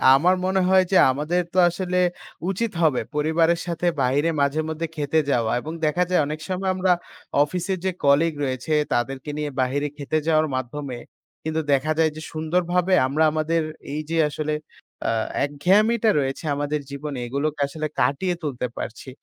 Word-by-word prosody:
আমার 180 Hz, +7 st, +4 dB
মনে 190 Hz, 0 st, +2 dB
হয় 190 Hz, 0 st, +5 dB
যে 190 Hz, -, +5 dB
আমাদের 155 Hz, +6 st, 0 dB
তো -, -, -3 dB
আসলে 180 Hz, +1 st, -2 dB, 0.5 s
উচিত 215 Hz, +3 st, -1 dB
হবে 150 Hz, -6 st, +3 dB
পরিবারের 160 Hz, +3 st, +2 dB
সাথে 170 Hz, 0 st, -1 dB
বাহিরে 140 Hz, +5 st, +2 dB
মাঝেমধ্যে 155 Hz, +3 st, -1 dB
খেতে 150 Hz, +1 st, +1 dB
যাওয়া 115 Hz, -3 st, +1 dB
এবং 155 Hz, -, -6 dB
দেখা 175 Hz, +4 st, +2 dB
যায় 180 Hz, -4 st, +3 dB
অনেক 155 Hz, +1 st, -4 dB
সময় 190 Hz, +1 st, -1 dB
আমরা 185 Hz, 0 st, +2 dB, 0.5 s
অফিসের 180 Hz, +5 st, -2 dB
যে 190 Hz, -, +2 dB
কলিগ 150 Hz, +4 st, +4 dB
রয়েছে, 130 Hz, +3 st, -2 dB, 0.2 s
তাদেরকে 130 Hz, +4 st, -2 dB
নিয়ে 150 Hz, -1 st, -2 dB
বাহিরে 140 Hz, +3 st, 0 dB
খেতে 145 Hz, +2 st, -1 dB
যাওয়ার 155 Hz, -1 st, +3 dB
মাধ্যমে 130 Hz, 0 st, -4 dB, 0.5 s
কিন্তু 160 Hz, 0 st, -1 dB
দেখা 140 Hz, +3 st, +1 dB
যায় 160 Hz, -1 st, +4 dB
যে 155 Hz, -, -7 dB
সুন্দর 160 Hz, +3 st, 0 dB
ভাবে 180 Hz, +1 st, +2 dB
আমরা 150 Hz, +4 st, +1 dB
আমাদের 155 Hz, +1 st, 0 dB, 0.3 s
এই 150 Hz, -, -2 dB
যে 165 Hz, -, 0 dB
আসলে 155 Hz, +1 st, -2 dB, 0.5 s
আ -, -, +2 dB, 0.3 s
একঘেয়ামিটা 210 Hz, +10 st, +3 dB
রয়েছে 135 Hz, +3 st, -2 dB
আমাদের 145 Hz, +1 st, -1 dB
জীবনে 140 Hz, 0 st, -5 dB
এগুলোকে 145 Hz, +4 st, -2 dB
আসলে 155 Hz, +2 st, -4 dB
কাটিয়ে 175 Hz, +6 st, +1 dB
তুলতে 130 Hz, -4 st, -2 dB
পারছি। 120 Hz, +3 st, -6 dB
155 Hz, 160 wpm, -23 LUFS, 140-175 Hz, 0.5 s, হয়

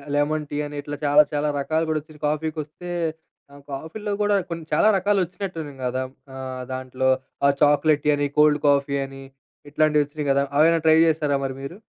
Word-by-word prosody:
Lemon 150 Hz, +1 st, 0 dB
tea 145 Hz, -, -3 dB
అని 145 Hz, -, -8 dB
ఇట్లా 145 Hz, +1 st, -6 dB
చాలా 145 Hz, +1 st, +6 dB
చాలా 150 Hz, 0 st, 0 dB
రకాలు 160 Hz, +3 st, 0 dB
కూడా 155 Hz, -1 st, +1 dB
వచ్చినాయి. 155 Hz, 0 st, -18 dB
కాఫీకొస్తే 155 Hz, +2 st, -4 dB, 0.6 s
ఆహ్, 145 Hz, -, -14 dB
కాఫీలో 200 Hz, +9 st, -5 dB
కూడా 205 Hz, 0 st, +3 dB
కొన్ని 165 Hz, -1 st, -5 dB
చాలా -, -, +4 dB
రకాలు 200 Hz, +1 st, +1 dB
వచ్చినట్టు 180 Hz, 0 st, -7 dB
ఉన్నాయి 140 Hz, -2 st, -10 dB
కదా, 130 Hz, +1 st, -1 dB, 0.3 s
ఆహ్, 130 Hz, -1 st, -6 dB
దాంట్లో 130 Hz, 0 st, -1 dB, 0.4 s
ఆ -, -, +6 dB
చాక్లెట్ 145 Hz, 0 st, +4 dB
టీ -, -, +3 dB
అని, 145 Hz, -, 0 dB
కోల్డ్ 150 Hz, -1 st, +5 dB
కాఫీ 140 Hz, 0 st, +2 dB
అని. 135 Hz, 0 st, -11 dB, 0.5 s
ఇట్లాంటివి 150 Hz, 0 st, +3 dB
వచ్చినాయి 145 Hz, 0 st, -5 dB
కదా, 140 Hz, 0 st, +3 dB, 0.2 s
అవేమన్న 165 Hz, +2 st, +5 dB
ట్రై 160 Hz, -, +7 dB
చేసారా 150 Hz, -3 st, +1 dB
మరి 135 Hz, -1 st, -2 dB
మీరు? 150 Hz, +8 st, -7 dB
150 Hz, 180 wpm, -23 LUFS, 140-160 Hz, 0.6 s, ట్రై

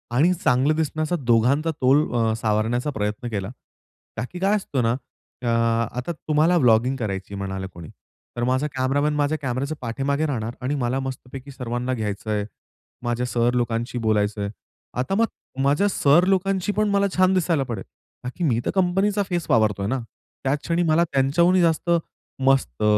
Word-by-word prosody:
आणि 165 Hz, +8 st, +4 dB
चांगलं 145 Hz, -3 st, +2 dB
दिसण्याचा 155 Hz, +1 st, -1 dB
दोघांचा 130 Hz, +6 st, +2 dB
तोल 135 Hz, +4 st, +4 dB
अ, 115 Hz, -2 st, +2 dB
सावरण्याचा 115 Hz, +5 st, 0 dB
प्रयत्न 105 Hz, 0 st, -3 dB
केला. 100 Hz, -3 st, -3 dB, 0.7 s
का 110 Hz, -, -1 dB
की 180 Hz, -, -7 dB
काय 195 Hz, +3 st, +2 dB
असतं 145 Hz, -11 st, -1 dB
ना, 115 Hz, -, +2 dB, 0.5 s
अ, 125 Hz, -, -3 dB, 0.5 s
आता 125 Hz, +7 st, -2 dB
तुम्हाला 160 Hz, +2 st, +2 dB
व्लॉगिंग 125 Hz, -2 st, +4 dB
करायची 100 Hz, -5 st, -4 dB
म्हणालं 95 Hz, -1 st, -4 dB
कोणी, 85 Hz, -2 st, -10 dB, 0.5 s
तर 120 Hz, -, -1 dB
माझा 130 Hz, +4 st, +1 dB
कॅमेरामन 140 Hz, +3 st, +1 dB
माझ्या 150 Hz, +1 st, +1 dB
कॅमेऱ्याच्या 135 Hz, +3 st, -2 dB
पाठीमागे 135 Hz, +5 st, -1 dB
राहणार 120 Hz, -6 st, -3 dB
आणि 130 Hz, +3 st, -1 dB
मला 130 Hz, -1 st, -1 dB
मस्तपैकी 130 Hz, +1 st, -7 dB
सर्वांना 125 Hz, -1 st, -3 dB
घ्यायचंय, 105 Hz, -2 st, -2 dB, 0.6 s
माझ्या 120 Hz, 0 st, -1 dB
सर 120 Hz, 0 st, +1 dB
लोकांशी 120 Hz, 0 st, -1 dB
बोलायचंय. 105 Hz, -2 st, 0 dB, 0.5 s
आता 130 Hz, +10 st, 0 dB
मग 230 Hz, +3 st, +4 dB, 0.4 s
माझ्या 145 Hz, +9 st, +3 dB
सर 170 Hz, -1 st, +4 dB
लोकांशी 195 Hz, +1 st, +1 dB
पण 215 Hz, 0 st, +2 dB
मला 200 Hz, 0 st, +2 dB
छान 185 Hz, 0 st, +4 dB
दिसायला 170 Hz, -5 st, +1 dB
पडेल. 115 Hz, -7 st, -5 dB, 0.4 s
का 125 Hz, -, -3 dB
की 175 Hz, -, -2 dB
मी 125 Hz, -8 st, +2 dB
तर -, -, 0 dB
कंपनीचा 195 Hz, +2 st, +2 dB
फेस 175 Hz, -3 st, -1 dB
वावरतोय 105 Hz, -3 st, +2 dB
ना. 130 Hz, +4 st, 0 dB, 0.4 s
त्याच 135 Hz, +2 st, +1 dB
क्षणी 170 Hz, +1 st, +1 dB
मला 165 Hz, 0 st, +3 dB
त्यांच्याहूनही 170 Hz, +7 st, +3 dB
जास्त 165 Hz, 0 st, +1 dB, 0.6 s
मस्त 120 Hz, -, +2 dB
130 Hz, 160 wpm, -23 LUFS, 115-160 Hz, 0.7 s, आणि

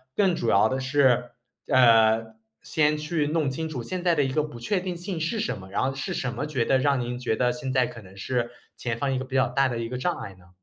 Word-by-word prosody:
更 190 Hz, -4 st, +3 dB
主 120 Hz, -, -1 dB
要 100 Hz, +1 st, +5 dB
的 130 Hz, -, -1 dB
是， 130 Hz, -3 st, +2 dB, 0.4 s
呃， 115 Hz, -2 st, +4 dB, 0.3 s
先 150 Hz, -1 st, +1 dB
去 150 Hz, 0 st, -1 dB
弄 155 Hz, -2 st, 0 dB
清 160 Hz, +5 st, -3 dB
楚 130 Hz, -6 st, -5 dB
现 180 Hz, +9 st, -4 dB
在 175 Hz, -2 st, +3 dB
的 145 Hz, -, +3 dB
一 135 Hz, -, -1 dB
个 150 Hz, +3 st, +1 dB
不 150 Hz, -6 st, -8 dB
确 185 Hz, -, 0 dB
定 180 Hz, -1 st, -4 dB
性 175 Hz, 0 st, -5 dB
是 165 Hz, +8 st, -1 dB
什 215 Hz, -, -2 dB
么， 95 Hz, -1 st, -11 dB
然 100 Hz, -, 0 dB
后 135 Hz, +1 st, 0 dB
是 135 Hz, -, -3 dB
什 125 Hz, -2 st, -2 dB
么 130 Hz, +4 st, -3 dB
觉 145 Hz, -6 st, -1 dB
得 130 Hz, -, +3 dB
让 140 Hz, -1 st, +2 dB
您 120 Hz, 0 st, -3 dB
觉 125 Hz, -3 st, 0 dB
得 125 Hz, +2 st, +2 dB
现 135 Hz, -1 st, -4 dB
在 130 Hz, -1 st, +3 dB
可 115 Hz, -, -10 dB
能 95 Hz, -1 st, -15 dB
是 120 Hz, +4 st, -2 dB, 0.3 s
前 115 Hz, -2 st, -3 dB
方 135 Hz, +2 st, -1 dB
一 -, -, 0 dB
个 130 Hz, -, -4 dB
比 130 Hz, 0 st, -7 dB
较 130 Hz, -1 st, +4 dB
大 135 Hz, +2 st, +2 dB
的 120 Hz, -2 st, -3 dB
一 115 Hz, 0 st, -3 dB
个 125 Hz, -, -4 dB
障 175 Hz, +7 st, -1 dB
碍 100 Hz, -, -8 dB
呢？ 90 Hz, -2 st, -21 dB
130 Hz, 295 characters per minute, -26 LUFS, 120-150 Hz, 0.4 s, 要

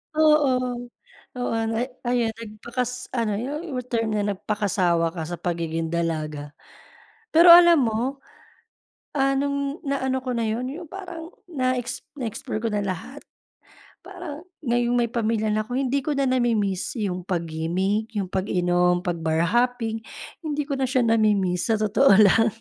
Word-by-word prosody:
Oo, 295 Hz, -5 st, +4 dB, 0.7 s
oo, 245 Hz, -, -1 dB, 0.2 s
na 235 Hz, +3 st, -1 dB, 0.2 s
ayun, 240 Hz, -2 st, 0 dB
nagpakas 235 Hz, +3 st, -5 dB
ano 215 Hz, -4 st, 0 dB
yung, 290 Hz, +7 st, -4 dB
yung 255 Hz, -, -2 dB
term 225 Hz, -3 st, -1 dB
na 210 Hz, -1 st, 0 dB
nagpakasawa 185 Hz, -5 st, 0 dB
ka 165 Hz, -, -3 dB
sa 170 Hz, +2 st, -6 dB
pagiging 165 Hz, -1 st, -2 dB
dalaga. 155 Hz, -3 st, -3 dB, 0.8 s
Pero 340 Hz, +2 st, +8 dB
alam 340 Hz, -3 st, +9 dB
mo, 245 Hz, +4 st, -1 dB, 0.9 s
ah, 275 Hz, -1 st, +2 dB
nung 280 Hz, +1 st, -1 dB
naano 265 Hz, -1 st, -1 dB
ko 255 Hz, -, -2 dB
na 230 Hz, -2 st, -1 dB
yun, 225 Hz, +3 st, -2 dB
yung 335 Hz, +1 st, -8 dB
parang 355 Hz, -3 st, -8 dB, 0.2 s
na 255 Hz, -2 st, +1 dB
ex 245 Hz, -1 st, -4 dB, 0.2 s
na 265 Hz, -, -4 dB
explore 225 Hz, 0 st, -4 dB
ko -, -, +2 dB
na 205 Hz, -, 0 dB
lahat, 210 Hz, -, -5 dB, 0.8 s
parang, 330 Hz, -1 st, -9 dB, 0.2 s
ngayong 240 Hz, -1 st, +1 dB
may 235 Hz, -1 st, +1 dB
pamilya 220 Hz, -2 st, 0 dB
na 215 Hz, +1 st, -1 dB
ko 245 Hz, -, -4 dB
hindi 275 Hz, +1 st, +1 dB
ko 290 Hz, +2 st, -2 dB
na 275 Hz, -, +1 dB
namimiss 235 Hz, -7 st, 0 dB
yung 185 Hz, -5 st, -3 dB
pag-gimik, 180 Hz, +6 st, -1 dB
yung 195 Hz, -3 st, -2 dB
pag-inom, 180 Hz, -2 st, +1 dB
'pag 175 Hz, -2 st, -2 dB
bar 160 Hz, 0 st, +1 dB
hopping, 235 Hz, +3 st, 0 dB, 0.4 s
hindi 300 Hz, -3 st, -2 dB
ko 280 Hz, -1 st, -4 dB
na 265 Hz, -, +1 dB
siya 255 Hz, 0 st, +2 dB
namimiss, 210 Hz, -6 st, +2 dB
sa 225 Hz, -, +3 dB
totoo 215 Hz, +2 st, +4 dB
lang. 215 Hz, +2 st, +6 dB
230 Hz, 155 wpm, -24 LUFS, 195-265 Hz, 0.9 s, alam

